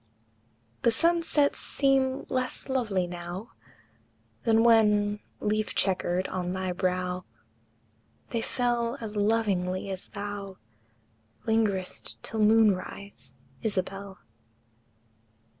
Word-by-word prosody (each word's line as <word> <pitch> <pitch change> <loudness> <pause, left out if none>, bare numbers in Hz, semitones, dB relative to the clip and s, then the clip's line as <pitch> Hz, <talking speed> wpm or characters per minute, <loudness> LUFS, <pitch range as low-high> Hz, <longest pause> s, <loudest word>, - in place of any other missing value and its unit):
The - - +4
sunsets 330 +1 +2
seem 270 -1 +1
less 255 0 -2
lovely 215 -9 +1
now 175 +4 -6 0.9
Than 225 -1 +5
when, 210 -3 +4 0.2
leaf 215 0 -1
checkered, 185 -1 +1
on 180 -1 -2
thy 185 -1 -2
brow 180 0 -1 1.1
They 230 - 0
fell 240 +1 0
as 220 -3 -6
lovingly 200 -3 +1
as 190 -1 -5
thou 200 -1 -6 0.9
Lingered'st 215 -5 0
till 220 - -4
moon 215 -1 +6
rise, 185 -9 -9 0.3
Isabel! 195 -1 -2
205 Hz, 90 wpm, -28 LUFS, 185-230 Hz, 1.1 s, moon